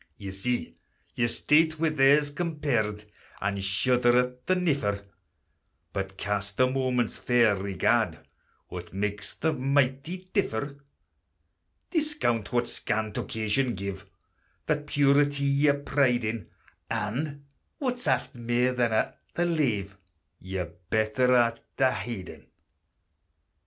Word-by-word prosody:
Ye 100 Hz, -1 st, -6 dB
see 110 Hz, +6 st, -3 dB, 0.4 s
your 120 Hz, -, +1 dB
state 155 Hz, +6 st, +3 dB
wi' 165 Hz, 0 st, +3 dB
theirs 145 Hz, 0 st, +4 dB
compared, 140 Hz, -11 st, -1 dB, 0.3 s
And 100 Hz, 0 st, -2 dB
shudder 120 Hz, +5 st, +3 dB
at 125 Hz, 0 st, -1 dB
the 185 Hz, -, +4 dB
niffer; 140 Hz, -, 0 dB, 0.9 s
But 95 Hz, 0 st, -4 dB
cast 100 Hz, +1 st, -3 dB
a 130 Hz, -, +7 dB
moment's 130 Hz, -2 st, 0 dB
fair 120 Hz, -4 st, +4 dB
regard, 100 Hz, 0 st, +1 dB, 0.5 s
What 90 Hz, 0 st, -8 dB
makes 105 Hz, +1 st, -3 dB
the 160 Hz, -1 st, 0 dB
mighty 140 Hz, +6 st, 0 dB
differ? 145 Hz, -, -1 dB, 1.1 s
Discount 300 Hz, -, 0 dB
what 120 Hz, -1 st, +1 dB
scant 110 Hz, 0 st, -2 dB
occasion 110 Hz, +3 st, 0 dB
gave 95 Hz, 0 st, -5 dB, 0.6 s
That 150 Hz, -1 st, -1 dB
purity 145 Hz, 0 st, +3 dB
ye 140 Hz, +1 st, +4 dB
pride 135 Hz, -3 st, +1 dB
in, 110 Hz, -3 st, -3 dB, 0.4 s
And 140 Hz, +7 st, -3 dB, 0.3 s
(what's 250 Hz, -, -3 dB
aft 130 Hz, -3 st, +1 dB
mair 120 Hz, +1 st, +1 dB
than 120 Hz, -2 st, +1 dB
a' 110 Hz, -, +1 dB, 0.2 s
the 175 Hz, -, +2 dB
lave) 110 Hz, -, 0 dB, 0.4 s
Your 95 Hz, 0 st, -3 dB, 0.2 s
better 110 Hz, +3 st, +2 dB
art 115 Hz, -1 st, +3 dB, 0.2 s
o' 130 Hz, -1 st, +4 dB
hidin'. 95 Hz, -3 st, -6 dB
125 Hz, 115 wpm, -28 LUFS, 105-145 Hz, 1.1 s, a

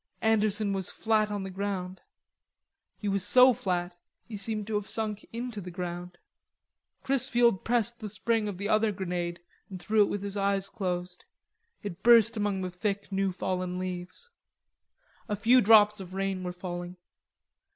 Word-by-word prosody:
Anderson 215 Hz, -2 st, +2 dB
was 190 Hz, -2 st, -2 dB
flat 215 Hz, -1 st, +1 dB
on 205 Hz, -1 st, -3 dB
the 190 Hz, -, -6 dB
ground. 190 Hz, -1 st, -4 dB, 1.0 s
He 210 Hz, -, -5 dB
was 200 Hz, -1 st, 0 dB
so 250 Hz, +5 st, +6 dB
flat 180 Hz, -4 st, -2 dB, 0.3 s
he 225 Hz, -, -7 dB
seemed 210 Hz, +1 st, -1 dB
to 220 Hz, -, -5 dB
have 205 Hz, 0 st, -2 dB
sunk 215 Hz, -2 st, -2 dB
into 230 Hz, -2 st, -5 dB
the 180 Hz, -, -7 dB
ground. 175 Hz, 0 st, -6 dB, 0.9 s
Chrisfield 240 Hz, -5 st, +2 dB
pressed 235 Hz, 0 st, 0 dB
the 215 Hz, -, -6 dB
spring 215 Hz, +2 st, 0 dB
of 200 Hz, -3 st, -4 dB
the 200 Hz, +2 st, -3 dB
other 215 Hz, 0 st, +3 dB
grenade 175 Hz, -3 st, -3 dB, 0.3 s
and 190 Hz, -2 st, -7 dB
threw 210 Hz, +4 st, +2 dB
it -, -, -1 dB
with 205 Hz, -1 st, -3 dB
his 200 Hz, 0 st, -5 dB
eyes 195 Hz, -1 st, 0 dB
closed. 180 Hz, -3 st, -4 dB, 0.6 s
It 200 Hz, -5 st, -6 dB
burst 230 Hz, -1 st, +6 dB
among 205 Hz, -3 st, -1 dB
the 180 Hz, -, -4 dB
thick 200 Hz, +2 st, -3 dB
new 195 Hz, 0 st, 0 dB
fallen 180 Hz, 0 st, -3 dB
leaves. 185 Hz, -, -6 dB, 1.0 s
A 210 Hz, -, 0 dB
few 235 Hz, +5 st, +5 dB
drops 210 Hz, -1 st, +6 dB
of 185 Hz, -1 st, -9 dB
rain 195 Hz, -1 st, -1 dB
were 180 Hz, -, -3 dB
falling. 175 Hz, 0 st, -6 dB
200 Hz, 160 wpm, -28 LUFS, 185-215 Hz, 1.0 s, so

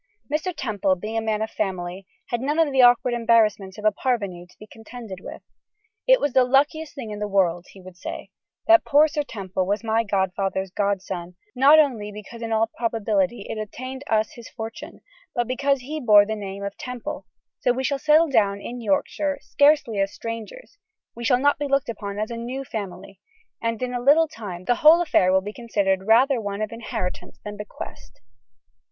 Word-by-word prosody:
Mr. 315 Hz, +5 st, 0 dB
Temple 210 Hz, -, 0 dB
being 215 Hz, +5 st, -6 dB
a 225 Hz, -, +1 dB
man 220 Hz, -1 st, -1 dB
of 220 Hz, -, -5 dB
family, 185 Hz, -2 st, -4 dB, 0.2 s
had 240 Hz, -1 st, -2 dB
none 290 Hz, +4 st, -1 dB
of 325 Hz, -3 st, +3 dB
the 265 Hz, -1 st, +4 dB
awkward 245 Hz, 0 st, +5 dB
embarrassments 220 Hz, -4 st, +2 dB
of 210 Hz, -, -8 dB
a 215 Hz, -, +5 dB
parvenu 200 Hz, -7 st, -2 dB
to 210 Hz, -, -15 dB
contend 225 Hz, +1 st, -11 dB
with. -, -, -9 dB, 0.6 s
'It -, -, +6 dB
was 285 Hz, -3 st, -1 dB
the 260 Hz, -, +5 dB
luckiest 290 Hz, +5 st, +1 dB
thing 235 Hz, -6 st, -6 dB
in 210 Hz, -, -6 dB
the 210 Hz, -, -2 dB
world,' 180 Hz, -3 st, +1 dB
he 195 Hz, -, -15 dB
would 185 Hz, -1 st, -12 dB
say, 180 Hz, -, -7 dB, 0.3 s
'that 335 Hz, 0 st, +6 dB
poor 295 Hz, +2 st, +5 dB
Sir 305 Hz, -1 st, -2 dB
Temple 190 Hz, -8 st, -4 dB
was 205 Hz, +3 st, -1 dB
my 225 Hz, 0 st, +1 dB
grandfather's 190 Hz, -1 st, -1 dB
godson, 190 Hz, -3 st, -3 dB, 0.2 s
not 280 Hz, +4 st, +7 dB
only 240 Hz, -9 st, +2 dB
because 210 Hz, +3 st, -10 dB
in 225 Hz, -1 st, -4 dB
all 220 Hz, 0 st, +3 dB
probability 220 Hz, -3 st, 0 dB
it 215 Hz, -, -5 dB
obtained 255 Hz, +5 st, -7 dB
us 220 Hz, -1 st, +1 dB
his 235 Hz, -1 st, -12 dB
fortune, 225 Hz, -1 st, -8 dB, 0.3 s
but 240 Hz, -, +1 dB
because 275 Hz, +2 st, 0 dB
he 300 Hz, +5 st, -5 dB
bore 210 Hz, -6 st, +6 dB
the 220 Hz, +1 st, -3 dB
name 200 Hz, -1 st, -6 dB
of 200 Hz, 0 st, -5 dB
Temple: 250 Hz, -2 st, -6 dB, 0.4 s
we 260 Hz, +2 st, -2 dB
shall 275 Hz, +1 st, 0 dB
settle 310 Hz, +3 st, +4 dB
down 200 Hz, -8 st, +2 dB
in 240 Hz, +4 st, -7 dB
Yorkshire 290 Hz, +3 st, 0 dB
scarcely 285 Hz, -7 st, +3 dB
as 195 Hz, 0 st, +1 dB
strangers, 230 Hz, -, -8 dB, 0.3 s
we 235 Hz, -, -8 dB
shall 250 Hz, +1 st, +4 dB
not 285 Hz, +1 st, +2 dB
be 290 Hz, -, -1 dB
looked 275 Hz, -2 st, +1 dB
upon 200 Hz, -3 st, -5 dB
as 215 Hz, +2 st, -3 dB
a 230 Hz, -, -4 dB
new 250 Hz, +4 st, -5 dB
family, 195 Hz, -5 st, -7 dB, 0.4 s
and 230 Hz, +1 st, -2 dB
in 250 Hz, 0 st, -3 dB
a 245 Hz, -, -2 dB
little 300 Hz, +5 st, +5 dB
time 205 Hz, -, -8 dB
the 245 Hz, +2 st, +2 dB
whole 315 Hz, +3 st, +8 dB
affair 190 Hz, -, +3 dB
will 190 Hz, 0 st, +3 dB
be 205 Hz, +2 st, -7 dB
considered 200 Hz, -5 st, -1 dB
rather 245 Hz, +3 st, +4 dB
one 205 Hz, 0 st, -3 dB
of 215 Hz, -, -4 dB
inheritance 220 Hz, -5 st, -5 dB
than 210 Hz, 0 st, -6 dB
bequest. 200 Hz, -, -10 dB
225 Hz, 195 wpm, -23 LUFS, 200-260 Hz, 0.6 s, whole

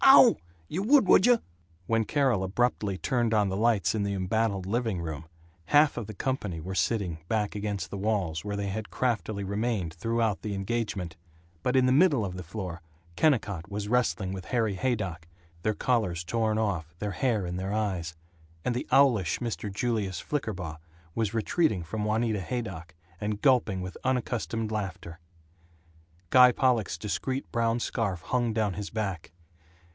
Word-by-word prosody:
Ow! -, -, +9 dB, 0.3 s
Y' 165 Hz, -, -3 dB
would, 250 Hz, +4 st, +5 dB
would 190 Hz, -, +6 dB
you!" 245 Hz, -2 st, +6 dB, 0.5 s
When 115 Hz, +1 st, +1 dB
Carol 130 Hz, -7 st, +2 dB
abruptly 105 Hz, -1 st, 0 dB
turned 120 Hz, +1 st, +1 dB
on 105 Hz, -2 st, +3 dB
the 95 Hz, -, -2 dB
lights 105 Hz, -5 st, +2 dB
in 110 Hz, -, -1 dB
the 100 Hz, 0 st, -1 dB
embattled 100 Hz, +1 st, 0 dB
living 110 Hz, -2 st, -1 dB
room, 80 Hz, -2 st, -5 dB, 0.4 s
half 145 Hz, -, +5 dB
of 115 Hz, -4 st, -4 dB
the 110 Hz, -, -8 dB
company 105 Hz, -9 st, -2 dB
were 90 Hz, +4 st, -5 dB
sitting 90 Hz, -2 st, 0 dB
back 105 Hz, -2 st, 0 dB
against 100 Hz, -4 st, -3 dB
the 100 Hz, -, -4 dB
walls, 95 Hz, -7 st, -1 dB
where 105 Hz, 0 st, -3 dB
they 100 Hz, 0 st, -2 dB
had 105 Hz, +2 st, -4 dB
craftily 110 Hz, -5 st, -1 dB
remained 100 Hz, -4 st, -1 dB
throughout 115 Hz, +3 st, 0 dB
the 105 Hz, -1 st, -3 dB
engagement, 95 Hz, -4 st, -3 dB, 0.4 s
but 125 Hz, +7 st, 0 dB
in 130 Hz, -1 st, +5 dB
the 130 Hz, -, +3 dB
middle 140 Hz, -, +4 dB
of 90 Hz, -1 st, -5 dB
the 90 Hz, -, -5 dB
floor 90 Hz, -1 st, -6 dB, 0.3 s
Kennicott 100 Hz, -, +1 dB
was 105 Hz, 0 st, -4 dB
wrestling 100 Hz, -5 st, +1 dB
with 95 Hz, -1 st, -6 dB
Harry 115 Hz, -5 st, 0 dB
Haydock 95 Hz, -7 st, -2 dB, 0.3 s
their 110 Hz, +3 st, 0 dB
collars 105 Hz, -10 st, 0 dB
torn 110 Hz, +2 st, 0 dB
off, 85 Hz, -7 st, -2 dB
their 105 Hz, +2 st, -3 dB
hair 110 Hz, -2 st, 0 dB
in 90 Hz, 0 st, -3 dB
their 95 Hz, +1 st, -3 dB
eyes; 95 Hz, -6 st, -2 dB, 0.5 s
and 125 Hz, -, +1 dB
the 125 Hz, -, -3 dB
owlish 120 Hz, -, +4 dB
Mr. 110 Hz, -3 st, -4 dB
Julius 100 Hz, -4 st, -1 dB
Flickerbaugh 95 Hz, -, -3 dB, 0.4 s
was 110 Hz, -1 st, -1 dB
retreating 115 Hz, -, +1 dB
from 105 Hz, +6 st, -3 dB
Juanita 110 Hz, -1 st, 0 dB
Haydock, 95 Hz, -7 st, -5 dB, 0.3 s
and 105 Hz, 0 st, -2 dB
gulping 120 Hz, -8 st, +3 dB
with 90 Hz, 0 st, -6 dB
unaccustomed 120 Hz, -3 st, -1 dB
laughter. 95 Hz, -5 st, -4 dB, 1.1 s
Guy 125 Hz, -1 st, +8 dB
Pollock's 120 Hz, -9 st, +1 dB
discreet 130 Hz, +8 st, -3 dB
brown 115 Hz, 0 st, +1 dB
scarf 100 Hz, -7 st, -2 dB
hung 120 Hz, +2 st, 0 dB
down 110 Hz, -3 st, 0 dB
his 100 Hz, +1 st, -5 dB
back. 100 Hz, -8 st, -3 dB
105 Hz, 165 wpm, -28 LUFS, 95-120 Hz, 1.1 s, Ow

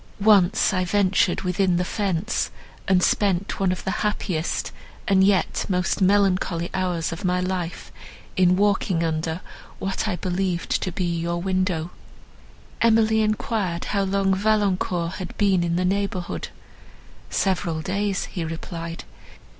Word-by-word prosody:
Once 200 Hz, -2 st, +4 dB
I 185 Hz, -1 st, +1 dB
ventured 190 Hz, 0 st, +2 dB
within 180 Hz, 0 st, +1 dB
the 180 Hz, -, 0 dB
fence, 200 Hz, +1 st, -1 dB, 0.4 s
and 185 Hz, -1 st, +3 dB
spent 200 Hz, -2 st, +1 dB
one 190 Hz, -2 st, +2 dB
of 185 Hz, -, -4 dB
the 190 Hz, -, -1 dB
happiest, 185 Hz, -5 st, -1 dB, 0.4 s
and 190 Hz, -1 st, +4 dB
yet 195 Hz, -1 st, +2 dB
most 180 Hz, +1 st, 0 dB
melancholy 185 Hz, -3 st, +2 dB
hours 180 Hz, -3 st, -1 dB
of 165 Hz, +4 st, -6 dB
my 180 Hz, 0 st, +1 dB
life 180 Hz, -2 st, -3 dB, 0.4 s
in 180 Hz, -1 st, +4 dB
walking 195 Hz, -3 st, +1 dB
under 160 Hz, +1 st, -2 dB, 0.4 s
what 195 Hz, +3 st, -2 dB
I 200 Hz, -, 0 dB
believed 180 Hz, 0 st, -2 dB
to 185 Hz, -, -2 dB
be 185 Hz, -, -3 dB
your 170 Hz, 0 st, -1 dB
window." 185 Hz, -2 st, -1 dB, 0.9 s
Emily 220 Hz, -1 st, +4 dB
enquired 215 Hz, -4 st, -1 dB
how 200 Hz, -, +2 dB
long 195 Hz, 0 st, +1 dB
Valancourt 190 Hz, -4 st, 0 dB
had 185 Hz, -, -7 dB
been 195 Hz, -4 st, +3 dB
in 170 Hz, 0 st, 0 dB
the 180 Hz, +1 st, +1 dB
neighbourhood. 195 Hz, -2 st, -2 dB, 0.8 s
"Several 170 Hz, -4 st, 0 dB
days," 200 Hz, 0 st, -1 dB
he 175 Hz, -, -5 dB
replied. 165 Hz, +1 st, -6 dB
185 Hz, 135 wpm, -23 LUFS, 175-200 Hz, 0.9 s, Once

